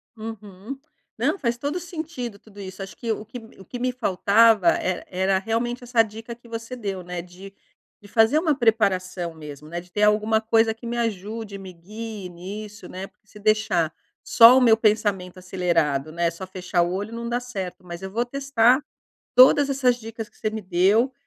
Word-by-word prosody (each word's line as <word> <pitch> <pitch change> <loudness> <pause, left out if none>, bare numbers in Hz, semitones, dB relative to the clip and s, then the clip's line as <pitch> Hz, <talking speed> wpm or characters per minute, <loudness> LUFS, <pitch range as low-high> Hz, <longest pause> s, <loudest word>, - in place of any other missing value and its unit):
Uhum. 215 +2 -8 0.4
Não, - - +1
faz 235 -3 -1
todo 285 +6 -3
o - - -2
sentido 315 - -6
tudo 205 -2 -16
isso, 190 0 -8
acho 195 - -8
que 230 -2 -3
o 215 - -2
me 215 - -10 0.2
que 195 - -17
o - - -14
que 245 - -7
me 255 0 0
faltava 215 -3 +3
era 185 -1 -1
era 190 +1 +1
realmente 240 +4 -2
essa 240 -1 +3
dica 225 +2 -8
que 235 0 -20
você 230 +2 -6
deu, 195 -6 -4
né, 180 -1 -5
de 185 +3 -13 0.5
de 205 - -14
fazer 225 +7 +4
uma 315 -2 +2
preparação 190 -8 +1
mesmo, 150 -1 -10
né, 170 +1 -4
de 180 - -14
ter 205 - -2
alguma 215 +1 +3
coisa 225 0 +3
que 225 +2 -14
me 240 +1 -3
ajude, 215 -1 -3
me 190 -1 -9
guie 210 +3 -8
nisso, 205 +5 -9
né, 190 +1 -6
porque - - -33
se 210 - -14
deixar 210 -7 +1 0.3
só 240 +2 +8
o - - +4
meu 230 -3 +6
pensamento 205 -4 0
acelerado, 165 -6 0
né, 170 +1 0
só 170 +3 -8
fechar 185 -1 -1
o 175 +1 0
olho 205 +4 -4
não 235 0 -5
dá 240 - 0
certo. 200 -8 -6
Mas 175 0 -8
eu 190 0 -6
vou 235 +3 0
testar 270 0 +2 0.5
todas 275 +2 +7
essas 255 -3 +2
dicas 225 -1 -7
que - - -33
você 215 - -1
me 220 0 -5
deu, 200 +8 +2
215 Hz, 200 wpm, -24 LUFS, 185-235 Hz, 0.5 s, só